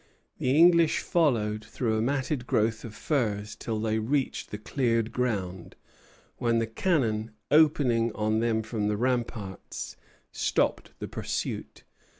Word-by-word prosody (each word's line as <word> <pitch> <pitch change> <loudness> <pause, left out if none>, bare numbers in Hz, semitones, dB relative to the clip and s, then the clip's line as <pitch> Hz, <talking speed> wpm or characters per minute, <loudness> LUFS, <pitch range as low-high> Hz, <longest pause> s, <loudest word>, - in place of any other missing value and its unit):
The 130 +3 +2
English 170 -1 +6
followed 110 -10 +1
through 110 +1 -2
a 110 - +1
matted 135 +1 -1
growth 110 0 +1
of 110 -2 -8
firs 105 -8 -1
till 110 -2 -3
they 110 0 0
reached 135 +5 -1
the 105 - -5
cleared 115 0 0
ground; 95 -8 -2 0.6
when 115 -1 +1
the 115 - +1
cannon, 115 -4 0 0.2
opening 140 -7 +4
on 110 +1 0
them 115 -1 +1
from 110 -1 -2
the 105 0 0
ramparts, 115 -5 -3 0.3
stopped - - 0
the - - -5
pursuit. - - -4
115 Hz, 135 wpm, -28 LUFS, 110-130 Hz, 0.6 s, English